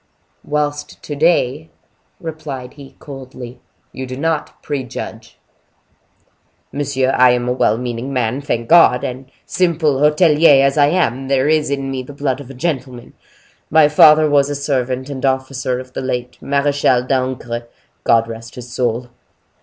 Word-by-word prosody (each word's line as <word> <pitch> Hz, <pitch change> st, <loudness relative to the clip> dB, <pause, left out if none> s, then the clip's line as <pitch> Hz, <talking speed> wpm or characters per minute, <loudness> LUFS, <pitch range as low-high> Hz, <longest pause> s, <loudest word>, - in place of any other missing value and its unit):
"Whilst 150 Hz, 0 st, -3 dB
to 145 Hz, -, -5 dB
day," 155 Hz, -1 st, +1 dB, 0.5 s
replied 150 Hz, -6 st, -7 dB
he, 140 Hz, -2 st, -14 dB
coldly, 130 Hz, -3 st, -10 dB, 0.3 s
"you 130 Hz, 0 st, -6 dB
do 130 Hz, 0 st, -6 dB
not 160 Hz, +1 st, -3 dB
prejudge." 135 Hz, -5 st, -6 dB, 1.3 s
"Monsieur, 135 Hz, -2 st, 0 dB
I 130 Hz, -1 st, +5 dB
am 120 Hz, 0 st, -1 dB
a 125 Hz, -, +1 dB
well 110 Hz, -3 st, +1 dB
meaning 125 Hz, +2 st, -4 dB
man, 125 Hz, 0 st, -1 dB
thank 120 Hz, -5 st, -3 dB
God! 150 Hz, -7 st, +5 dB
and 130 Hz, 0 st, -6 dB, 0.2 s
simple 160 Hz, -6 st, +1 dB
hotelier 150 Hz, -1 st, +5 dB
as 140 Hz, 0 st, +1 dB
I 145 Hz, -1 st, +4 dB
am, 135 Hz, -6 st, 0 dB
there 135 Hz, 0 st, +1 dB
is 155 Hz, -1 st, +2 dB
in 135 Hz, -1 st, -2 dB
me 130 Hz, -1 st, -3 dB
the 130 Hz, +3 st, -10 dB
blood 140 Hz, -2 st, -2 dB
of 135 Hz, -, -12 dB
a 135 Hz, -, -10 dB
gentleman. 130 Hz, -5 st, -4 dB, 0.6 s
My 155 Hz, -1 st, +5 dB
father 155 Hz, +1 st, +6 dB
was 145 Hz, -1 st, +3 dB
a 145 Hz, -, -2 dB
servant 130 Hz, -2 st, -2 dB
and 140 Hz, -3 st, -7 dB
officer 130 Hz, -1 st, -1 dB
of 130 Hz, 0 st, -11 dB
the -, -, -4 dB
late 125 Hz, -1 st, -4 dB
Marechal 140 Hz, -3 st, +1 dB
d'Ancre. 125 Hz, -2 st, -2 dB, 0.4 s
God 115 Hz, 0 st, +3 dB
rest 115 Hz, +1 st, -9 dB
his 125 Hz, -1 st, -9 dB
soul!" 120 Hz, -1 st, -1 dB
135 Hz, 155 wpm, -18 LUFS, 125-145 Hz, 1.3 s, father